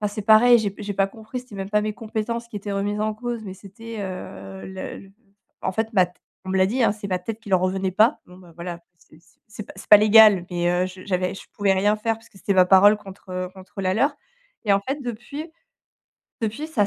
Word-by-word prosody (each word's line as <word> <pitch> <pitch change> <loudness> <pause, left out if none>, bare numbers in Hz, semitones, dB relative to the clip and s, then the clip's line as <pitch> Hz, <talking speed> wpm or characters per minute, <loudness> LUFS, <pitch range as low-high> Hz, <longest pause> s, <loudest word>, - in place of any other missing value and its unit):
enfin, 210 - 0
c'est 215 - -4
pareil, 225 +3 +7
j'ai 210 -3 -1
p 200 - -11
j'ai 205 0 -4
pas 195 0 +2
compris. 220 +4 -8
C'était 245 -5 -13
même 195 0 -5
pas 210 0 +2
mes 215 0 -2
compétences 230 +1 -4
qui 215 - -8
étaient 205 0 -5
remises 205 +1 -1
en 215 0 0
cause, 235 0 -5
mais 190 - -6
c'était, 220 +4 -10
heu, 95 - -7
le 190 0 -7
le 195 0 -15 0.5
en - - -1
fait 220 +3 -2
ma 185 -3 +4
tê 180 - -22 0.3
on - - -9
me 190 - +1
l'a 185 - +5
dit, 245 +6 0
hein, - - +4
c'est 210 -1 -7
ma 185 -1 -1
tête 220 +4 -5
qui 210 - -11
leur 185 -2 +4
revenait 185 0 -1
pas. 220 +9 +4
Bon 180 0 -15
bah 180 -2 -16
voilà, 170 0 -6 0.2
c'est 155 - -21 0.3
c'est 215 0 -8
p - - -12
c'est 190 - -11
pas 210 - +11
légal 210 -3 +7
mais 175 -1 0
heu, 180 +1 +1
je 185 0 -11
j'avais 185 -1 -1
je - - -9
pouvais 200 -1 +2
rien 205 +3 +2
faire 225 +1 -1
parce 225 - -19
que - - -23
c'était 200 - -1
ma 185 -1 +6
parole 200 +3 +7
contre, 195 -1 -13
heu, 185 0 -3
contre 190 +1 -10
la 185 0 +1
leur 275 +7 +2 0.5
et 205 - +3
en 195 - +3
fait, 270 +8 -4
depuis 250 +7 -6 0.9
depuis 225 +7 -3
ça 210 -10 +1
205 Hz, 255 wpm, -23 LUFS, 185-220 Hz, 0.9 s, pas